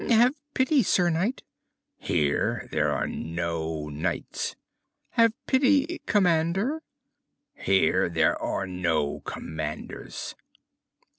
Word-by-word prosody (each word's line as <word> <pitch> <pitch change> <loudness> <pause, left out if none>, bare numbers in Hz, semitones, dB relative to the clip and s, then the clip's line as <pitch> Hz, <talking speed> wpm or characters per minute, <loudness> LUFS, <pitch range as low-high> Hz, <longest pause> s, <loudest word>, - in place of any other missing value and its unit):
"Have 240 +3 +5 0.2
pity, 265 +2 +4
Sir 180 -4 +3
Knight!" 190 +11 -1 0.6
"Here 75 -4 0
there - - +1
are - - 0
no 80 -2 -3
knights!" 80 +4 -3 0.6
"Have 230 -1 +5
pity, 280 +5 +3
Commander!" 190 - +2 0.7
"Here 95 -2 +2
there 80 -1 +2
are 95 - -1
no 85 -6 -1
commanders!" 75 -1 -6
160 Hz, 90 wpm, -27 LUFS, -, 0.7 s, Have